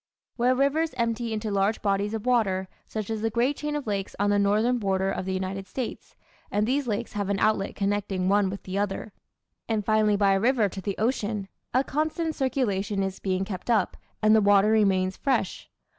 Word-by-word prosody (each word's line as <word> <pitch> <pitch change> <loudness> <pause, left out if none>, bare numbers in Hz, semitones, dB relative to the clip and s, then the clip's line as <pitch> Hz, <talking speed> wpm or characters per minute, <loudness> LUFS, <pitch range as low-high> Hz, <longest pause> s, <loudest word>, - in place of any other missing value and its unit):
Where 250 +1 +2
rivers 280 +2 +1
empty 235 0 -1
into 215 -1 -2
large 200 +2 +1
bodies 200 +1 0
of 220 +1 -5
water, 200 -7 +2 0.2
such 215 -1 -4
as 220 -1 -2
the 225 - +1
great 240 +6 +1
chain 300 +1 -3
of 295 - -3
lakes 200 -3 -3
on 205 +1 +2
the 205 - +3
northern 215 +5 +2
border 195 -2 0
of 190 - -3
the 190 - -2
United 190 +1 -4
States 255 +2 -6 0.3
(and 205 +1 +1
these 265 +3 0
lakes 210 -3 -2
have 205 -1 -2
an 200 - +1
outlet 215 -1 +1
connecting 200 -2 -1
one 200 0 +3
with 195 +1 -6
the 190 +1 -3
other, 205 +1 -3 0.6
and 215 -3 0
finally 215 -1 +3
by 200 -1 +4
a 195 - +2
river 235 -1 +3
to 190 - -7
the 200 0 -3
ocean) 210 -3 -1 0.2
a 255 +2 +3
constant 315 +3 -1
circulation 210 -8 0
is 195 0 -4
being 190 0 -1
kept 190 +2 -7
up, 215 -6 +2 0.3
and 215 +1 +6
the 220 - +5
water 205 +1 +5
remains 190 -3 +2
fresh. 250 -9 -1
210 Hz, 205 wpm, -26 LUFS, 195-235 Hz, 0.6 s, and